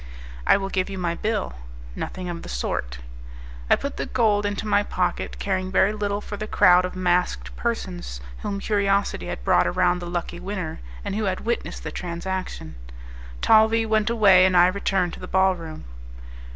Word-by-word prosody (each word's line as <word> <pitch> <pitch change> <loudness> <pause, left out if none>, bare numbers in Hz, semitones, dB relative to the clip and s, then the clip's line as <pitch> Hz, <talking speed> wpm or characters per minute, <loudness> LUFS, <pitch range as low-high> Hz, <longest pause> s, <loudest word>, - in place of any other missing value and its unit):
"I - - +6
will 195 -1 -3
give 185 0 -1
you 195 - -5
my 175 -2 -1
bill." 210 +3 -2 0.4
"Nothing 185 -1 -5
of 170 -1 -5
the - - -9
sort." - - -3 0.7
I - - +7
put 280 - -5
the - - -3
gold 210 -4 +2
into 205 +1 -3
my 205 -1 +3
pocket, 185 -3 -2
caring 185 -1 -2
very 190 +2 +3
little 205 -1 -2
for 205 - -7
the 215 +1 -5
crowd 180 -2 +5
of 180 - -6
masked 180 -1 0
persons 185 - -4 0.2
whom 200 - -3
curiosity 200 -1 0
had - - -5
brought 90 +7 +3
around 175 - +2
the 175 -1 -6
lucky 175 0 -4
winner, 185 -3 -4 0.3
and - - -2
who 215 0 -1
had 185 -1 -1
witnessed 235 +1 -3
the - - -5
transaction. 180 - -5 0.7
Talvis 220 +1 +5
went 220 0 +1
away, 200 -5 +6
and 185 -1 +4
I 175 - +8
returned 190 -2 0
to - - -8
the - - -7
ball 190 0 +3
room. 160 -2 -8
190 Hz, 180 wpm, -24 LUFS, 180-205 Hz, 0.7 s, I